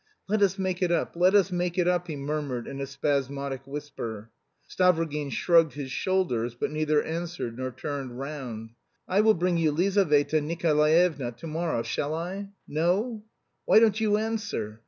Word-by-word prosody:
"Let 210 Hz, +1 st, +1 dB
us 195 Hz, 0 st, +3 dB
make 185 Hz, -1 st, -2 dB
it 180 Hz, -2 st, +2 dB
up; 170 Hz, -, 0 dB
let 180 Hz, +3 st, +4 dB
us 195 Hz, -2 st, +4 dB
make 175 Hz, 0 st, -1 dB
it 180 Hz, -1 st, +2 dB
up!" 180 Hz, 0 st, +1 dB
he 155 Hz, -, -4 dB
murmured 140 Hz, -4 st, -3 dB
in 140 Hz, -, -6 dB
a 135 Hz, -, -3 dB
spasmodic 140 Hz, -1 st, -2 dB
whisper. 115 Hz, -7 st, -6 dB, 0.4 s
Stavrogin 165 Hz, -5 st, +1 dB
shrugged 165 Hz, -1 st, +3 dB
his 140 Hz, -2 st, -6 dB
shoulders, 125 Hz, -11 st, 0 dB
but 120 Hz, -, -2 dB
neither 155 Hz, -1 st, +1 dB
answered 165 Hz, -7 st, -4 dB
nor 130 Hz, 0 st, -2 dB
turned 135 Hz, -2 st, -5 dB
round. 135 Hz, -5 st, -5 dB
"Listen. 115 Hz, -, -31 dB, 0.3 s
I 195 Hz, +3 st, +3 dB
will 220 Hz, 0 st, +5 dB
bring 175 Hz, 0 st, +1 dB
you 160 Hz, -2 st, +2 dB
Lizaveta 155 Hz, -3 st, +2 dB
Nikolaevna 155 Hz, -3 st, +2 dB
to 120 Hz, +7 st, -12 dB
morrow; 160 Hz, -6 st, -1 dB
shall 150 Hz, +5 st, -2 dB
I? 190 Hz, +4 st, -5 dB, 0.2 s
No? 200 Hz, +9 st, 0 dB, 0.4 s
Why -, -, +5 dB
don't 220 Hz, -1 st, +4 dB
you 210 Hz, -1 st, +3 dB
answer? 215 Hz, -, -3 dB
160 Hz, 170 wpm, -27 LUFS, 140-180 Hz, 0.4 s, will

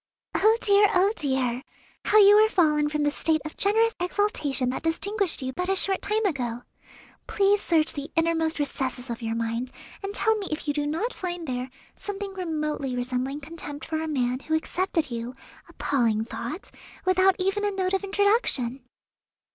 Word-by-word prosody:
"Oh, 440 Hz, +2 st, +4 dB
dear, 405 Hz, 0 st, +5 dB
oh, 380 Hz, +3 st, +4 dB
dear! 260 Hz, -, 0 dB, 0.4 s
how 425 Hz, -, +4 dB
you 410 Hz, -1 st, +8 dB
are 435 Hz, -, +3 dB
fallen 300 Hz, -6 st, +3 dB
from 300 Hz, 0 st, -1 dB
the 290 Hz, -, +2 dB
state 315 Hz, +1 st, +1 dB
of 310 Hz, -, -7 dB
generous 445 Hz, +3 st, +2 dB
exaltation 345 Hz, -9 st, 0 dB
that -, -, -4 dB
distinguished 370 Hz, 0 st, -1 dB
you 260 Hz, 0 st, -3 dB
but 360 Hz, +6 st, -3 dB
a 385 Hz, -, +2 dB
short 385 Hz, 0 st, +1 dB
time 430 Hz, +1 st, 0 dB
ago. 245 Hz, -9 st, -2 dB, 0.6 s
Please 405 Hz, 0 st, +2 dB
search 320 Hz, -2 st, +3 dB
the 285 Hz, +1 st, -6 dB
innermost 325 Hz, -1 st, +1 dB
recesses 265 Hz, -3 st, -3 dB
of 235 Hz, -, -5 dB
your 225 Hz, 0 st, -2 dB
mind, 230 Hz, +2 st, -2 dB, 0.3 s
and 400 Hz, +1 st, -5 dB
tell 445 Hz, -, +4 dB
me 395 Hz, -, -5 dB
if 305 Hz, 0 st, -4 dB
you 290 Hz, -, +1 dB
do 290 Hz, 0 st, -1 dB
not 335 Hz, +11 st, -2 dB
find 350 Hz, -2 st, -5 dB
there 250 Hz, 0 st, -3 dB, 0.3 s
something 400 Hz, -1 st, -5 dB
remotely 305 Hz, -7 st, -3 dB
resembling 255 Hz, +3 st, -2 dB
contempt 295 Hz, -1 st, -7 dB
for 315 Hz, -1 st, -2 dB
a 320 Hz, -, -3 dB
man 255 Hz, -4 st, 0 dB
who 315 Hz, +3 st, -1 dB
accepted 325 Hz, -2 st, -1 dB
you 235 Hz, +2 st, -5 dB, 0.3 s
appalling 225 Hz, -5 st, 0 dB
thought! 315 Hz, -, -6 dB, 0.3 s
without 375 Hz, 0 st, +4 dB
even 390 Hz, +2 st, 0 dB
a 415 Hz, -, +2 dB
note 380 Hz, -1 st, -1 dB
of 385 Hz, -, 0 dB
introduction." 395 Hz, -, +1 dB
320 Hz, 175 wpm, -26 LUFS, 265-390 Hz, 0.6 s, you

